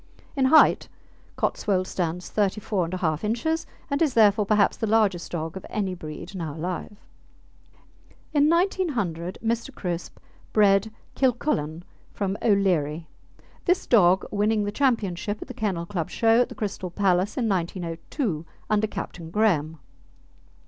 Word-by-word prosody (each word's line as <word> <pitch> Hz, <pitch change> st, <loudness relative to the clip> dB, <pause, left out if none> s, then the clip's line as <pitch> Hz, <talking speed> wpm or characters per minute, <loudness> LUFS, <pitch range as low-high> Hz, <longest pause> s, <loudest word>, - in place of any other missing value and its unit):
In 270 Hz, -2 st, +2 dB
height 310 Hz, +4 st, +5 dB, 0.5 s
Cotswold 185 Hz, -3 st, 0 dB
stands 180 Hz, -1 st, -3 dB
34 200 Hz, -3 st, 0 dB
1/2 165 Hz, -3 st, -1 dB
inches 245 Hz, +10 st, -1 dB, 0.2 s
and 280 Hz, 0 st, -1 dB
is 300 Hz, -6 st, +2 dB
therefore 210 Hz, -2 st, +5 dB
perhaps 210 Hz, -1 st, +3 dB
the 225 Hz, -, -2 dB
largest 205 Hz, -5 st, +2 dB
dog 165 Hz, 0 st, -4 dB
of 190 Hz, -, -7 dB
any 195 Hz, -3 st, -2 dB
breed 165 Hz, +1 st, -8 dB
now 165 Hz, -6 st, -5 dB
alive. 180 Hz, +5 st, -4 dB, 1.4 s
In 295 Hz, 0 st, +4 dB
1900 270 Hz, -, 0 dB
Mr. 230 Hz, +4 st, -1 dB
Crisp 175 Hz, -2 st, -4 dB, 0.4 s
bred 205 Hz, 0 st, +4 dB, 0.2 s
Kilcullen 200 Hz, -, 0 dB, 0.3 s
from 195 Hz, -1 st, -1 dB
O'Leary, 175 Hz, -7 st, +1 dB, 0.6 s
this 360 Hz, +1 st, +2 dB
dog 190 Hz, -5 st, +4 dB
winning 210 Hz, +1 st, +1 dB
the 205 Hz, -, -2 dB
championship 210 Hz, -6 st, 0 dB
at -, -, -8 dB
the 255 Hz, -, -7 dB
Kennel 200 Hz, -8 st, -2 dB
Club 170 Hz, -4 st, -3 dB
Show 225 Hz, +1 st, +3 dB
at -, -, 0 dB
the -, -, -9 dB
Crystal 200 Hz, -5 st, -4 dB
Palace 185 Hz, +1 st, +1 dB
in 240 Hz, -3 st, +1 dB
1902 175 Hz, -, -2 dB, 0.3 s
under 215 Hz, 0 st, +3 dB
Captain 180 Hz, -5 st, -7 dB
Graham. 165 Hz, -6 st, +1 dB
200 Hz, 135 wpm, -25 LUFS, 175-225 Hz, 1.4 s, height